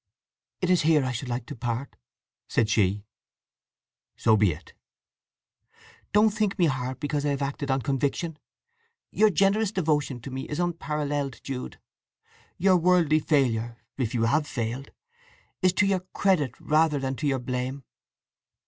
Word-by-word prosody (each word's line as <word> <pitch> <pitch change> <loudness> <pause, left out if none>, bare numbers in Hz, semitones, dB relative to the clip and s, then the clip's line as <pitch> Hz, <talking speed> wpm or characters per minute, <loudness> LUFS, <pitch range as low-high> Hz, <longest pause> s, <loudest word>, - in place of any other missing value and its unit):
"It 180 -1 +1
is 180 -4 +4
here—I 150 -5 +3
should 125 +1 -5
like 120 -1 -3
to - - -8
part," 120 +3 -4 0.5
said 110 -1 +1
she. 100 -1 +2 1.1
"So 110 -1 +4
be 105 -3 +3
it!" 80 +1 -11 1.4
"Don't 210 +1 +5
think 210 -1 -1
me 180 - +4
hard 130 -3 -2
because 145 0 -2
I 145 - +1
have 140 0 -1
acted 140 +1 -3
on 135 -1 +1
conviction. 145 +5 -1 0.7
Your 215 0 +4
generous 200 +3 +2
devotion 150 - 0
to 135 - -8
me 130 +1 -5
is 150 - -3
unparalleled, 150 -5 -2
Jude! 130 -2 -5 0.8
Your 185 +1 +4
worldly 170 -3 +3
failure, 120 -7 +1 0.2
if 125 -3 -2
you 115 - +1
have 145 +7 +2
failed, 120 +3 -4 0.7
is 185 -1 +4
to 205 - +3
your 195 -1 +2
credit 180 - 0
rather 155 0 +2
than 135 -1 -2
to 150 - -1
your 135 -1 +1
blame. 125 +2 -4
140 Hz, 150 wpm, -26 LUFS, 125-170 Hz, 1.4 s, Don't